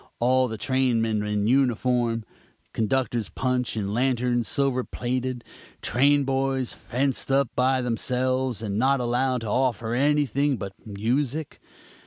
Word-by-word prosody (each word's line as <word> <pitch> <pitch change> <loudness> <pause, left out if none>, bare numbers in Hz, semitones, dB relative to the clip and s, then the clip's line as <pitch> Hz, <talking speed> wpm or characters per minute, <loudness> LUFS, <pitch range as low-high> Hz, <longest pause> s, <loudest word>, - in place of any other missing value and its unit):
All 130 +2 +3
the 110 -2 -5
trainmen 115 -4 +1
in 105 -1 -1
uniform; 120 -2 +1 0.5
conductor's 120 0 0
punch 125 -2 -1
and 100 -1 -2
lanterns 120 -1 +1
silver 135 -3 +1
plated; 125 0 -3 0.4
train 140 +3 +3
boys 135 -1 -1
fenced 135 +2 -2
up 135 -2 +2
by 130 0 +2
themselves 125 0 0
and 100 -1 -2
not 135 +2 +3
allowed 125 +1 0
to 115 - -5
offer 120 -1 0
anything 140 0 +2
but 100 -2 -6
music. 130 +8 -2
125 Hz, 125 wpm, -25 LUFS, 115-135 Hz, 0.5 s, All